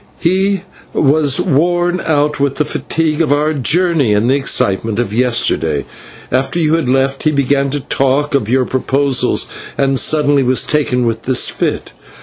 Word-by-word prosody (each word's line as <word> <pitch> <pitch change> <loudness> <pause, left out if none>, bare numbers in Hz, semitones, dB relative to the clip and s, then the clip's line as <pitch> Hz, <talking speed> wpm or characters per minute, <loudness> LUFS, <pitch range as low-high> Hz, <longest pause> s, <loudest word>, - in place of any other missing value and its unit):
"He 190 +2 0 0.3
was 145 0 +2
worn 175 +2 +1
out 150 -2 0
with 140 -1 0
the 150 - 0
fatigue 155 +1 -1
of 155 -4 0
our 150 +2 +1
journey 150 - +1
and 105 +3 +1
the 130 - +3
excitement 110 -5 0
of 115 -4 -2
yesterday. 115 - 0 0.5
After 135 +7 0
you 155 -2 +1
had 165 -6 0
left 135 +1 0
he 155 - +2
began 140 -1 0
to 145 +1 -2
talk 135 +2 0
of 115 -6 0
your 130 +1 +2
proposals, 135 +1 0 0.3
and 135 -1 +1
suddenly 145 -2 +2
was 130 0 +2
taken 135 -5 0
with 115 -1 -2
this 130 -1 +2
fit. - - -3
140 Hz, 160 wpm, -14 LUFS, 130-155 Hz, 0.5 s, the